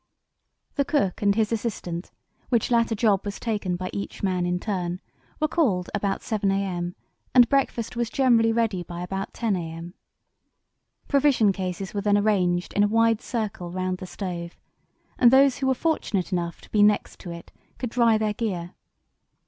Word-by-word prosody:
The 280 - +4
cook 265 - 0
and 200 -1 +3
his 220 0 +1
assistant, 200 -6 -3 0.4
which 235 -1 +1
latter 230 -1 +3
job 205 -3 +3
was 205 0 -5
taken 205 -6 -1
by 185 +1 -5
each 200 - -6
man 180 -2 +1
in 180 0 0
turn, 180 -3 -3 0.4
were 310 - +2
called 220 - +1
about 200 -1 -1
7 210 -3 0
a.m., 180 -3 -1 0.4
and 245 -2 +8
breakfast 255 -4 0
was 235 -1 -1
generally 235 -4 +3
ready 225 -5 0
by 175 0 -6
about 195 +2 -4
10 225 -4 0
a.m. 165 0 -6 1.1
Provision 275 -7 +4
cases 190 0 -4
were 205 - -1
then 205 0 +3
arranged 185 -4 +1
in 205 - +2
a 205 - +5
wide 225 +1 +3
circle 210 -7 -4
round 185 +1 -2
the 185 - -7
stove, 175 -3 -6 0.6
and 245 - +7
those 270 +1 +5
who 270 - 0
were 265 - +3
fortunate 230 - -1
enough 170 -2 -2
to - - -17
be 210 - +3
next 210 0 +2
to 180 - -8
it 170 0 -9 0.3
could 245 -3 -4
dry 230 -2 +4
their 215 -1 0
gear. 185 -6 -3
205 Hz, 175 wpm, -25 LUFS, 180-230 Hz, 1.1 s, and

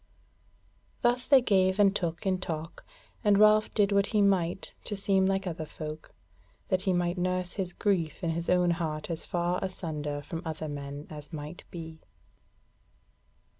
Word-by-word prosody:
Thus 245 +1 +2
they 270 -3 +6
gave 190 -3 +3
and 200 -1 +4
took 170 -2 -2
in 185 -1 +1
talk, 165 -1 -5 0.4
and 205 -2 +5
Ralph 215 +1 +5
did 205 -2 +3
what 200 0 +3
he 210 -2 +2
might 185 -3 +1
to 210 - -2
seem 195 -1 +2
like 195 0 0
other 160 -3 -4
folk, 155 0 -8 0.5
that 185 -3 +2
he - - +5
might 175 0 0
nurse 180 0 0
his 185 -3 -3
grief 175 -5 -1
in 165 - +1
his 170 +1 -3
own 180 -1 +4
heart 160 -1 -2
as 165 - -5
far 175 +1 0
asunder 150 -6 -4
from 165 +3 -5
other 160 -1 -4
men 145 0 -6
as 150 0 -9
might 155 +1 -7
be. 160 -2 -8
175 Hz, 165 wpm, -29 LUFS, 160-195 Hz, 0.5 s, they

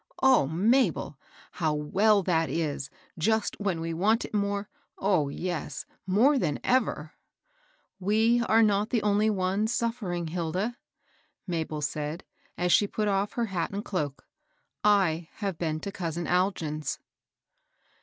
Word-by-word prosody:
"O 260 - +5
Mabel! 180 - +1 0.3
how 155 -3 0
well 195 +7 +3
that 165 -3 +1
IS, 145 -4 -2 0.3
just 220 +5 +1
when 195 -5 -1
we 165 0 -3
want 215 +8 +2
it - - -11
more 200 -1 -1 0.2
— - - -56
oh, 185 -8 +1
yes, 155 -2 -4 0.2
more 250 +10 +4
than 145 - 0
ever! 220 -12 0 0.3
" - - -38
" 200 - -41
We 225 +3 +4
are 225 +1 +5
not 210 0 +2
the 235 - 0
only 210 +1 +3
ones 200 +2 0
suflFering, 195 -9 -2
Hilda," 180 +7 -2 0.7
Mabel 160 -4 -3
said, 150 +3 -3 0.3
as 180 0 +1
she 205 - +5
put 210 +1 -2
off 200 0 0
her 235 - 0
hat 170 -2 -1
and 200 +2 -5
cloak. 150 -8 -3
^^ - - -45 0.6
I 180 -5 +3
have 195 -5 -4
been 155 -2 -1
to 200 - -4
cousin 170 -2 -3
Algin's." 175 -5 0
190 Hz, 150 wpm, -28 LUFS, 160-215 Hz, 0.7 s, O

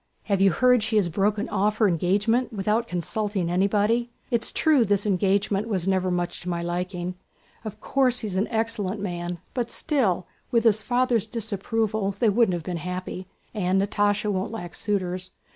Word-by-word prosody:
Have 200 -2 0
you 195 - +6
heard 250 +4 +4
she 220 +1 -2
has 200 -5 +3
broken 205 +5 0
off 210 +1 +1
her 220 - +4
engagement 205 +8 +1
without 215 +2 0
consulting 185 0 -1
anybody? 210 +6 +2 0.2
It's 235 -1 +1
true 300 -6 +3
this 205 -1 +1
engagement 200 +1 +1 0.2
never 185 -1 +1
was - - 0
much 175 0 -3
to 180 - -5
my 170 -1 -2
liking. 180 +1 -3 0.5
Of 215 -3 -7
course 255 -2 +1
he 220 - -3
is 190 - -4
an 195 +3 +1
excellent 220 -3 -2
man, 175 -2 -4 0.2
but 240 -2 -2
still, 210 - 0 0.2
with 235 -2 +2
his 220 -2 +4
father's 245 -3 +1
disapproval 220 -1 -1
they 215 +3 +2
wouldn't 210 -3 +3
have 170 - -5
been 175 +1 -3
happy, 180 +2 -5 0.3
and 190 -3 +1
Natásha 205 +1 +1
won't 190 +1 -2
lack 175 -6 -6
suitors. 185 -3 -2
205 Hz, 175 wpm, -25 LUFS, 185-225 Hz, 0.5 s, you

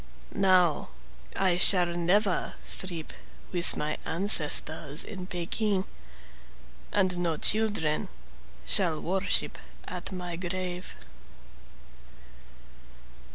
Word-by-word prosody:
Now 185 - +2 0.5
I 185 -2 +1
shall 180 -2 +6
never 180 +3 0
sleep 175 -4 -3 0.4
with 175 -1 +5
my 150 +1 -3
ancestors 160 -4 +2
in 185 -4 -8
Pekin, 190 +3 -2 1.1
And 185 -3 0
no 170 -3 -2
children 210 -8 +1 0.6
shall 160 - 0
worship 190 +2 0 0.3
at 180 +1 -6
my 180 -2 -6
grave. 180 0 -6
180 Hz, 80 wpm, -27 LUFS, 170-190 Hz, 1.1 s, shall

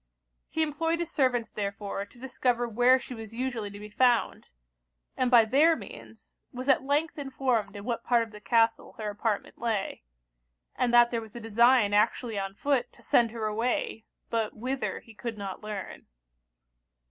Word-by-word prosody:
He 320 - +1
employed 325 +2 -1
his 340 -1 -4
servants 250 -4 +1
therefore 200 0 -4
to 245 - -21
discover 245 -2 0
where 245 +3 +5
she 255 - -8
was 225 -1 -9
usually 240 -4 -3
to 200 - -10
be 210 0 -10
found, 245 +1 +2 0.7
and 255 -1 +1
by 235 -3 +7
their 295 +8 +4
means - - -12 0.2
was 255 +1 -6
at 270 - +4
length 295 +3 0
informed 260 -6 -1
in 200 - -7
what 235 +1 -3
part 235 -1 +3
of 225 - -10
the 210 -1 -12
castle 225 0 +2
her 215 -1 -4
apartment 210 0 -3
lay; 220 -4 -2 0.7
and 245 - +1
that 240 0 +6
there 230 -1 -1
was 220 0 -12
a - - -5
design 230 -1 +4
actually 220 +1 +1
on 195 0 -4
foot 260 0 0
to - - -20
send 235 -1 +4
her 225 -1 -4
away, 225 +1 -1 0.3
but 225 -2 -1
whither 260 +4 -3
he 225 - -16
could 225 0 -6
not 195 -2 -6
learn. 210 -2 -7
235 Hz, 175 wpm, -28 LUFS, 215-255 Hz, 0.7 s, by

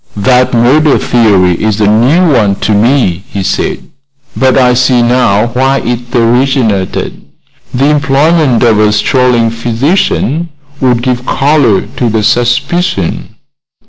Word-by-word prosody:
"That 125 +4 +1
murder 140 +6 +2
theory 100 -7 +1
is 110 -1 -1
a 105 - +2
new 135 - +2
one 105 -5 +1
to - - -1
me," 105 -4 0
he 100 -1 -5
said; - - -3 0.5
"but 130 -1 +1
I 125 -2 +3
see 125 -1 +1
now 120 -3 +1
why 135 +2 0
it 120 +1 -5
originated. 120 -4 -1 0.5
The 130 +2 -1
employment 145 -2 +1
of 110 -3 +2
a 105 0 +2
strolling 120 0 +1
physician 135 - -1 0.3
would 125 -2 0
give 125 -1 -3
color 135 -8 +1 0.2
to 120 - 0
the 110 -1 -1
suspicion." 125 - -1
125 Hz, 130 wpm, -9 LUFS, 110-135 Hz, 0.5 s, I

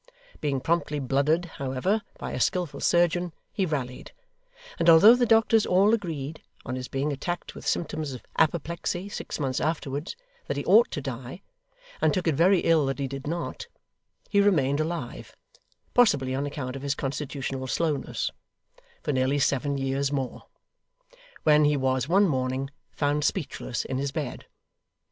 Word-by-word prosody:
Being 140 -3 -1
promptly 165 -2 0
blooded, 140 +5 +1
however, 140 +7 -1 0.2
by - - -5
a - - -3
skilful 175 -6 0
surgeon, 175 0 +2 0.2
he 190 -3 0
rallied; 130 -5 -4 0.7
and 170 - +4
although 170 +8 +9
the 245 -1 +2
doctors 225 -1 +4
all 195 +4 +4
agreed, 160 -8 -3 0.2
on 130 - -3
his 130 -1 -5
being 140 +2 -1
attacked 175 +6 -4
with - - -9
symptoms 155 -4 -1
of 125 - -9
apoplexy 170 +4 0
six - - -5
months 135 -3 -1
afterwards, 150 -1 -2 0.3
that - - -2
he - - -3
ought 475 - +6
to - - -4
die, - - -7 0.6
and - - +3
took 185 - -1
it 160 - +3
very 175 +5 +4
ill 160 -4 +3
that 135 -1 -2
he 140 - -2
did 135 +1 -7
not, 170 - -4 0.6
he 200 - +3
remained 145 -8 +3
alive 155 -5 -4 0.6
possibly 145 - +3
on 140 +2 -1
account 130 -3 -5
of 135 - -6
his 140 0 -1
constitutional 135 -1 -4
slowness 150 0 -1 0.7
for - - 0
nearly 130 +2 +1
seven 140 +1 +1
years 135 +1 -1
more, 135 -3 -3 1.0
when 150 0 +5
he 150 0 +3
was 130 0 0
one 195 +3 +5
morning 130 -1 -1 0.2
found 145 0 0
speechless 150 -7 -2
in 130 - -2
his 140 0 -2
bed. 140 -3 -5
145 Hz, 160 wpm, -26 LUFS, 135-170 Hz, 1.0 s, although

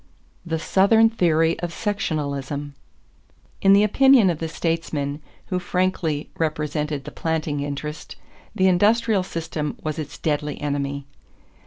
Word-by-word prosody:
=The 165 -1 -2
Southern 220 +7 +4
Theory 165 -5 +2
of 175 -1 -3
Sectionalism.= 145 -8 -3 0.9
In 195 0 +6
the 200 +1 +6
opinion 240 -2 +5
of 160 - -5
the 165 - -2
statesmen 155 -3 -2 0.3
who 185 - 0
frankly 180 -5 -1
represented 150 -2 -1
the - - -8
planting 155 -3 -2
interest, 145 +2 -5 0.4
the 190 - +3
industrial 205 +3 +3
system 165 -4 -4
was 155 0 -3
its 145 -1 -6
deadly 150 -1 -2
enemy. 140 -1 -2
160 Hz, 125 wpm, -23 LUFS, 150-185 Hz, 0.9 s, In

